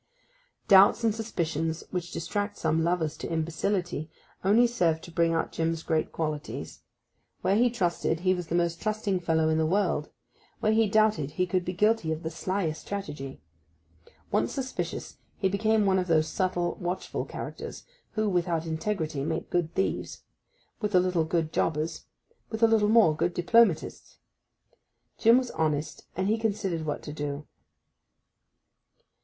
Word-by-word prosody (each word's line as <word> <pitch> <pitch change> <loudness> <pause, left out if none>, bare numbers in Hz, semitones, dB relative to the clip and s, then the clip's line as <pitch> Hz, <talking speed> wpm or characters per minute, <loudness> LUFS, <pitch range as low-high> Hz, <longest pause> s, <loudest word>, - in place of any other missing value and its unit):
Doubts 200 +4 +7
and 225 -2 +3
suspicions 165 -7 -2
which 175 -2 -3
distract 205 +5 -3
some 160 +1 +1
lovers 165 -3 0
to - - -5
imbecility 165 0 -1 0.3
only 215 +6 +5
served 175 -9 +1
to 170 - -10
bring 165 0 +2
out 165 - -1
Jim's 165 0 -1
great 160 -1 0
qualities. 155 -2 -4 0.6
Where 190 +2 +2
he 240 +3 +4
trusted 175 -6 -1
he 185 0 +3
was 180 -2 -4
the 165 - -1
most 170 -1 0
trusting 215 -3 0
fellow 160 -2 +1
in 160 0 +2
the 160 - +2
world; 180 -4 +1 0.5
where 215 - +2
he 220 0 +4
doubted 215 -9 +3
he 180 +4 0
could 180 0 0
be 180 - -3
guilty 210 -3 +2
of 160 +1 -3
the 160 - -3
slyest 165 -2 -2
strategy. 145 -10 -6 0.9
Once 115 - +1
suspicious, 265 -1 -4 0.2
he 195 - +1
became 215 +2 +2
one 190 -1 +3
of 180 - -2
those 155 -2 +3
subtle, 175 0 -1
watchful 175 +1 -3
characters - - -7 0.3
who, 215 0 0
without 175 -3 0
integrity, 160 -3 -2
make 160 +2 -3
good 175 -2 0
thieves; 190 - -2 0.6
with 210 -3 -1
a - - +8
little, 180 -3 +1
good 160 -1 -1
jobbers; 155 +1 -1 0.4
with 220 0 -3
a - - +8
little 220 -2 +3
more, 215 -9 +5
good 175 +3 -1
diplomatists. 180 -2 +2 1.0
Jim 230 +2 +6
was 255 -1 -1
honest, 155 -1 -2
and 190 +2 0
he 220 +2 +1
considered 195 -7 -1
what 145 - -3
to 150 - -6
do. 145 0 -4
175 Hz, 155 wpm, -28 LUFS, 160-205 Hz, 1.0 s, a